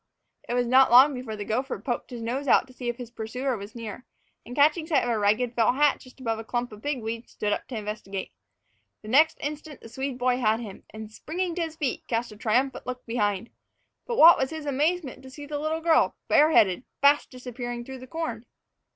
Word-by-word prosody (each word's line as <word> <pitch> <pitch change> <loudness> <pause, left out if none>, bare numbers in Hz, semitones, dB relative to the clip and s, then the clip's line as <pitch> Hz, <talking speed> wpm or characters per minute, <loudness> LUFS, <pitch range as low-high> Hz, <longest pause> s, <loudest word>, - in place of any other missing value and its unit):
It 240 - 0
was 245 0 +2
not 260 +2 +5
long 260 +4 +7
before 250 -4 -5
the 205 -1 -6
gopher 255 +6 -2
poked 245 -3 -4
his 240 -3 -7
nose 260 +5 -3
out - - +5
to 260 - -17
see 250 -1 -4
if 240 - -3
his 245 -2 -8
pursuer 250 +3 -3
was 200 +1 -9
near, 230 +1 -7 0.4
and, 245 - -9
catching 310 +3 +3
sight 320 - +2
of 245 - -2
a 225 - 0
ragged 215 +4 +1
felt 235 +1 +2
hat 290 0 +3
just 255 +1 -17
above 225 -3 -2
a - - -6
clump 240 +1 -3
of 210 0 -12
pigweed, 230 -5 -4
stood 210 -1 -2
up - - -4
to 245 - -5
investigate. 210 -2 -5 0.7
The 215 - -9
next 305 +6 +4
instant 295 0 -6
the 230 - -11
Swede 265 +1 -4
boy 250 0 +1
had 220 -3 +2
him 210 -5 -9
and, 220 0 -9
springing 345 +9 -3
to 350 - -3
his 325 -1 -3
feet, 290 -6 -3
cast 235 0 -2
a - - -11
triumphant 245 +6 0
look 255 0 -5
behind. 210 -2 -1 0.6
But 475 -2 -2
what 335 +2 +9
was 265 - 0
his 315 -2 -7
amazement 290 0 -1
to 265 - -12
see 290 +2 -10
the 290 0 -4
little 310 +2 -2
girl, 325 -1 +3
bareheaded, 255 - +4 0.2
fast 285 +1 +4
disappearing 245 -1 -6
through 265 0 -8
the 255 - -11
corn! 325 +4 -5
250 Hz, 220 wpm, -26 LUFS, 230-290 Hz, 0.7 s, what